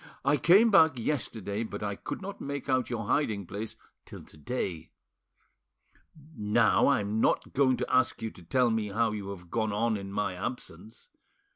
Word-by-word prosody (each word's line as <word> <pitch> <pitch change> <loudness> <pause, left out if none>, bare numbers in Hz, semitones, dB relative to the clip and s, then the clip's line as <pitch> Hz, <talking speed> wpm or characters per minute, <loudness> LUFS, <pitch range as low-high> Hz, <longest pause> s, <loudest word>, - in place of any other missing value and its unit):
I 145 +2 +4
came 200 +9 +5
back 160 -8 +6
yesterday, 110 -5 -2
but 110 - -5
I 100 -1 -2
could 190 - -6
not 200 +1 -7
make 140 -1 -5
out 130 -2 +1
your 115 -3 -3
hiding 110 -6 0
place 105 +5 -6 0.3
till - - -11
to - - -16
day. 80 - -4 1.5
Now 105 +1 +3
I'm 105 -6 +1
not - - +1
going 130 -2 +3
to 125 - -3
ask 130 -1 +2
you 110 -1 -4
to - - -15
tell 120 +8 +2
me 110 -2 0
how 110 +2 +1
you 100 -2 -5
have 90 -3 -9
gone 110 -2 0
on 110 +1 0
in 100 -1 -7
my 100 -1 -1
absence. 100 0 -7
110 Hz, 175 wpm, -29 LUFS, 100-130 Hz, 1.5 s, back